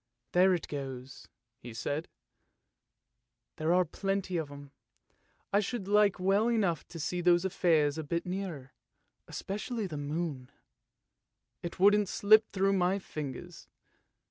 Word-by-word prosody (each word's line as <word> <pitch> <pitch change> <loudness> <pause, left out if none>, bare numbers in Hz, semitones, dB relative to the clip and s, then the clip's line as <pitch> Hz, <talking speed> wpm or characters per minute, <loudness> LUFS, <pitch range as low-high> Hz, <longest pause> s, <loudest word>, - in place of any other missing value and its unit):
" - - -53
There 185 +1 +5
it 170 - -5
goes! 135 -2 -7 0.2
" - - -57
he 120 -4 -10
said; 145 +7 -3 0.7
" - - -56
there 155 +1 0
are 180 +1 +4
plenty 195 +2 -2
of 160 -4 -2
them. 140 -1 -11 0.8
I 200 - +5
should 210 -1 -3
like 205 -2 +4
well 195 +4 +3
enough 200 -8 0
to 165 - -9
see 175 +4 -2
those 175 +1 +4
affairs 160 -5 +2
a - - -3
bit 170 +3 -2
nearer, 180 -8 -5 0.5
especially 210 +3 -4
the 160 -5 -5
moon; 145 -3 -3 1.1
it 170 0 -6
wouldn't 205 0 +5
slip 215 +1 +5
through 195 0 +2
my 185 0 +2
fingers. 150 -8 -7
175 Hz, 145 wpm, -31 LUFS, 150-195 Hz, 1.1 s, There